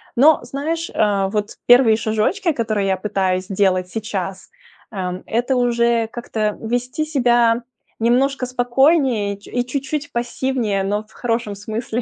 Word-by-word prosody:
Но 295 +5 +6
знаешь, 310 +7 -3
э, 200 -2 +1
вот 210 0 -3
1 245 -2 +6
шажочки, 230 - 0
которые 220 -7 -1
я 190 - +1
пытаюсь 185 -2 -1
делать 190 -2 +1
сейчас: 195 -3 -5 0.4
эм, 185 -3 -4
это 240 +4 0
уже, 235 -1 +2
как-то 215 -3 -2
вести 245 +6 -2
себя 240 -5 +2 0.4
немножко 255 +3 +2
спокойнее 250 -3 +2
и - - -19
чу 200 - -17
и 245 0 -1
чуть-чуть 280 +3 -3
пассивнее, 235 -4 -1
но 205 +2 -1
в 215 - -26
хорошем 230 -3 -2
смысле, 220 +3 -4
235 Hz, 140 wpm, -20 LUFS, 205-255 Hz, 0.4 s, Но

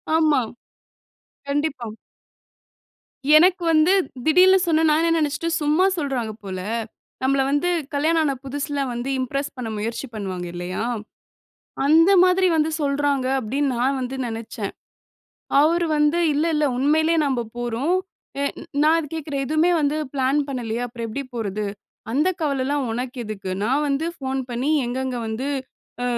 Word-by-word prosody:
ஆமா. 305 -5 +4 1.1
கண்டிப்பா. 280 -5 -1 1.5
எனக்கு 360 +1 +4
வந்து 315 +3 +4 0.3
திடீர்ன்னு 365 +4 +6
சொன்னா, 320 -1 +3
நான் 310 +2 +3
என்ன 330 0 +2
நெனச்சுட்டேன், 325 +3 0
"சும்மா 305 +5 +3
சொல்றாங்க 260 -7 -2
போல. 190 -2 -5 0.6
நம்பள 270 +1 +3
வந்து 290 +5 +1 0.2
கல்யாணம் 320 +3 +2
ஆன 280 -3 +1
புதுசுல 285 +1 -3
வந்து, 240 +3 -4
இம்ப்ரஸ் 275 +3 -2
பண்ண 245 -3 -4
முயற்சி 230 +5 -3
பண்ணுவாங்க 185 -4 -4
இல்லையா? 175 +3 -4 1.1
அந்த 325 +5 +6
மாதிரி 370 +1 +3
வந்து 310 0 +2
சொல்றாங்க." 280 -2 +1
அப்படீன்னு 270 +5 -1
நா 250 - +3
வந்து 255 +1 -4
நெனச்சேன். 225 -2 -5 0.9
அவரு 335 +3 +3
வந்து 300 +3 +3
இல்ல 295 +2 +1
இல்ல, 300 - +2
உண்மையிலே 315 +4 +3
நம்ப 260 -3 0 0.2
போறோம். 240 +8 0 0.5
எ - - +1 0.4
நா 310 - +5
அத 320 - -3
கேக்குறேன், 290 -3 -3
"எதுவுமே 315 +5 +2
வந்து 295 +1 +1 0.2
பிளான் 270 +2 +2
பண்ணலையே. 240 -3 -3
அப்பறம் 235 -1 -6
எப்படி 275 +6 -4
போறது?", 215 -2 -3 0.5
"அந்த 300 +8 +2
கவலைலாம் 280 -1 0
உனக்கு 245 +3 -4
எதுக்கு? 200 -3 -5
நா 230 - 0 0.2
வந்து 280 +3 0
ஃபோன் 265 0 -2
பண்ணி 250 +5 -1 0.2
எங்கங்க 260 +1 -2
வந்து 230 +5 -3 0.5
அ - - 0
280 Hz, 140 wpm, -23 LUFS, 245-310 Hz, 1.5 s, திடீர்ன்னு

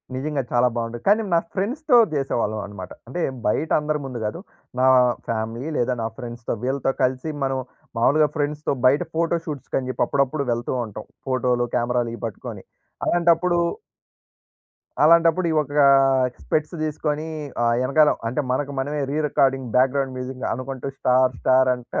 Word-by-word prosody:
నిజంగా 140 +1 -2
చాలా 120 +1 +4
బావుంటది. 115 0 -4
కానీ 210 +2 +5
నా 170 - +5
ఫ్రెండ్స్‌తో 245 +7 +2 0.2
చేసేవాళ్ళమన్నమాట. 105 -8 -3 0.2
అంటే 170 +7 -4 0.3
బయట 155 +9 0
అందరి 150 0 -1
ముందు 125 -3 -5
గాదు. 105 +10 -3 0.4
నా 130 - +4 0.4
ఫ్యామిలీ 115 +5 -3
లేదా 125 +1 +1
నా - - 0
ఫ్రెండ్స్‌తో 120 -1 -5
వీళ్ళతో 135 +1 0
కలిసి 130 +4 0
మనం 135 0 0 0.4
మాములుగా 150 +6 +4
ఫ్రెండ్స్‌తో 150 -1 -1
బయట 140 +5 +5
ఫోటో 170 +1 +1
షూట్స్‌కని 135 -3 -4
చెప్పి - - 0
అప్పుడప్పుడు 140 +1 0
వెళ్తూ 120 +2 -2
ఉంటాం. 105 0 -9 0.2
ఫోటో‌లు 125 -1 +1
కెమెరా‌లు 120 -1 0
ఇవి - - -14
పట్టుకొని. 110 - -8 0.4
అలాంటప్పుడు 175 +1 +3 1.5
అలాంటప్పుడు 170 +2 +5
ఈ - - 0
ఒక 145 - -8 0.7
స్పెక్ట్స్ 155 +2 -1
తీసుకొని 155 0 -2 0.4
ఆహ్, 115 0 +3
ఎనకాల 150 +3 +4 0.2
అంటే 125 +6 -1
మనకు 140 +2 -1
మనమే 145 +2 -2
re 150 - -1
recording 135 -2 +1
back 130 +1 +4
ground 135 -2 -1
music 130 0 -6
అనుకుంటూ 130 +2 -5
స్టార్ 130 0 +3
స్టార్ 130 0 +4
అంట 125 -1 -8
135 Hz, 145 wpm, -23 LUFS, 125-150 Hz, 1.5 s, కానీ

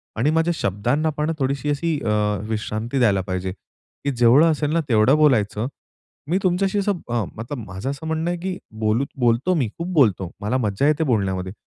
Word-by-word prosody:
आणि 120 +7 +1
माझ्या 165 +2 +2
शब्दांना 120 +11 0
पण 150 +2 0
थोडीशी 140 +2 -1
अशी 150 +1 0
अ, 105 -1 +1
विश्रांती 110 +4 -2
द्यायला 100 -5 +3
पाहिजे 95 0 -3
की 140 +7 -8
जेवढं 125 +7 +5
असेल 150 -1 -1
ना 170 - +3
तेवढं 115 +4 +5
बोलायचं. 120 -7 +2 0.6
मी 180 - +2
तुमच्याशी 190 +2 +1
असं 200 +1 +1 0.2
अ, 120 -3 0
मतलब 115 +6 -6
माझं 95 +7 -5
असं 140 +3 -7
म्हणणं 160 +1 -1
आहे, 175 - -2
की 185 +1 -3 0.2
बोलू 110 +4 +1
बोलतो, 120 +9 +2
मी 135 -8 +1
खूप 170 +1 -4
बोलतो, 100 - +2
मला 110 +6 0
मज्जा 110 +3 0
येते 155 +1 +2
बोलण्यामध्ये, 95 - -1
130 Hz, 180 wpm, -22 LUFS, 105-155 Hz, 0.6 s, जेवढं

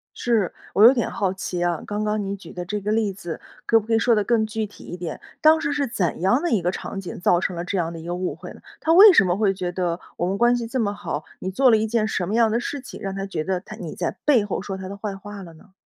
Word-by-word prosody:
是， 225 -7 0 0.2
我 205 - +5
有 240 +3 +10
点 240 - -1
好 195 -5 -1
奇 180 -2 -3
啊， 175 -2 0
刚 210 0 -2
刚 210 0 0
你 195 +1 -3
举 185 -4 -12
的 180 0 -6
这 205 +3 -3
个 210 +2 -2
例 215 -2 +1
子， 175 -4 -7 0.3
可 225 - +5
不 215 - -11
可 230 - 0
以 225 - +3
说 240 0 +3
得 210 -2 +2
更 230 -1 +2
具 220 0 -3
体 205 - -15
一 175 - -7
点？ 170 -3 -6 0.2
当 315 +1 +5
时 285 - -1
是 285 -2 0
怎 190 -6 -1
样 235 +9 +3
的 345 -1 -1
一 215 - +2
个 175 - 0
场 195 - -6
景 185 - -7
造 175 - +4
成 185 0 -2
了 170 - -3
这 190 +2 -3
样 170 -1 -1
的 165 - -7
一 160 - -10
个 175 - -3
误 180 0 -3
会 - - -10
呢？ - - -13 0.2
她 320 - +1
为 395 +3 +10
什 210 - +6
么 180 0 0
会 205 -3 +2
觉 180 -2 -3
得 175 -1 -2 0.2
我 175 - 0
们 195 +2 -1
关 240 +2 +4
系 235 -1 -4
这么 225 -4 -1
好， 180 -6 -4 0.2
你 185 - -4
做 255 +6 +4
了 220 - +6
一 220 +1 0
件 215 -1 +1
什 190 -4 -1
么 200 +5 -2
样 230 -2 +4
的 230 - +1
事 280 +3 -4
情， 255 - -10
让 195 -1 -4
她 195 0 -3
觉 170 -6 -3
得 185 -1 -1
她 215 +2 -10
你 170 -7 -7
在 175 - -1
背 265 -8 +5
后 205 -2 -3
说 195 0 -5
她 190 0 -7
的 200 - -7
坏 200 -1 -4
话 205 +1 -9
了 170 -2 -11
呢？ 190 +5 -19
200 Hz, 335 characters per minute, -23 LUFS, 180-225 Hz, 0.3 s, 有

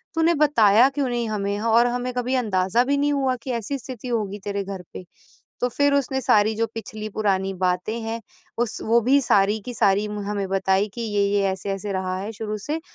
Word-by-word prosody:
तूने 325 +1 +3
बताया 240 -6 +5
क्यों 275 -1 -1
नहीं 240 -1 -1
हमें 205 -1 -2
और 230 +2 +4
हमें 245 +1 -2
कभी 250 +1 -1
अंदाज़ा 210 -2 +1
भी 280 +2 +1
नहीं 290 +1 +1
हुआ 265 -2 +1
कि 260 - -3
ऐसी 235 +4 -3
स्थिति 255 -1 -8
होगी 210 -4 -2
तेरे 200 -1 -2
घर 195 -1 -6
पे। - - -7 0.6
तो 245 - +3
फिर 285 +4 +2
उसने 265 -1 0
सारी 220 -4 +3
जो 230 +1 +1
पिछली 215 -1 -6
पुरानी 195 -2 0
बातें 185 +4 -1
हैं, 225 +1 -4 0.4
उस 235 -1 -2
वो 230 +2 +4
भी 265 +5 +4
सारी 205 -3 +3
की 245 - -5
सारी 205 -2 +2
म 210 0 -5
हमें 200 -1 -2
बताई 195 +1 +1
कि 240 - -5
ये-ये 205 -2 +1
ऐसे-ऐसे 195 +2 -4
रहा 185 -1 -2
है 205 +3 -5
शुरू 215 -1 -4
से, 295 +10 -3
220 Hz, 205 wpm, -23 LUFS, 200-250 Hz, 0.6 s, बताया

